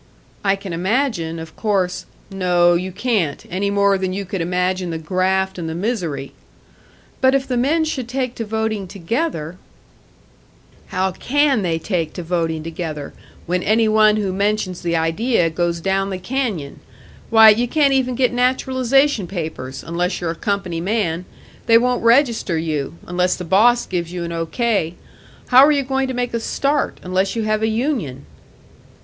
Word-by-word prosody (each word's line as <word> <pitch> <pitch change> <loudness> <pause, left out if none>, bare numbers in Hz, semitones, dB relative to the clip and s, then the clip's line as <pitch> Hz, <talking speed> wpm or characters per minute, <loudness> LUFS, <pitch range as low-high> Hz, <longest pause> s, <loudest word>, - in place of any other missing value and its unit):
"I 195 -1 +3
can 195 -2 -7
imagine, 185 -3 -1
of 160 0 -9
course 190 -4 -1
" - - -30
"No, 180 -2 +3
you 180 +2 -1
can't. 185 - -1
Any 195 +3 -1
more 200 -1 +2
than 185 -1 -2
you 200 +1 -3
could 190 -1 -4
imagine 180 +1 -1
the 165 - -3
graft 190 +3 0
and 165 -1 -4
the 160 - -4
misery!" 170 - -3 0.9
"But 260 +1 +4
if 275 0 0
the 255 - -1
men 300 +7 +2
should 265 -6 -3
take 255 -1 -2
to 230 - -2
voting 220 -2 -2
together 185 - -3 0.6
" - - -30
"How 190 +1 +1
can 275 +4 +1
they 170 -3 0
take 165 -2 -2
to 175 - -6
voting 165 -2 -1
together 160 -3 -5 0.3
when 180 +1 0
any 220 +3 +2
one 215 0 +5
who 200 -3 -1
mentions 200 -2 -1
the 170 -1 -1
idea 165 +3 +1
goes 170 +1 -1
down 195 +2 0
the 190 - -3
canyon? 195 - -3 0.5
Why, 220 -1 +8
you 230 +3 +3
can't 285 +1 +3
even 255 -2 +1
get 250 0 +2
naturalisation 260 -1 +2
papers, 155 -8 -5
unless 175 +2 -1
you're 170 -2 -2
a - - -6
company 195 -5 -2
man; 180 -3 -1 0.4
they 230 - +7
won't 250 +1 +1
register 230 - +3
you, 155 -2 -2
unless 180 +1 0
the 180 - -7
boss 230 +7 +4
gives 175 -2 -3
you 180 -1 -4
an 170 - -5
O. 165 0 -3
K. 200 -5 0 0.5
How 255 +1 +8
are 295 - +6
you 285 -2 +2
going 265 0 -1
to 260 - -4
make 245 -1 -2
a 230 - 0
start, 280 +5 -1
unless 185 +3 0
you 225 - -1
have 215 0 0
a 220 - +2
union?" 220 - -2
195 Hz, 175 wpm, -20 LUFS, 175-235 Hz, 0.9 s, Why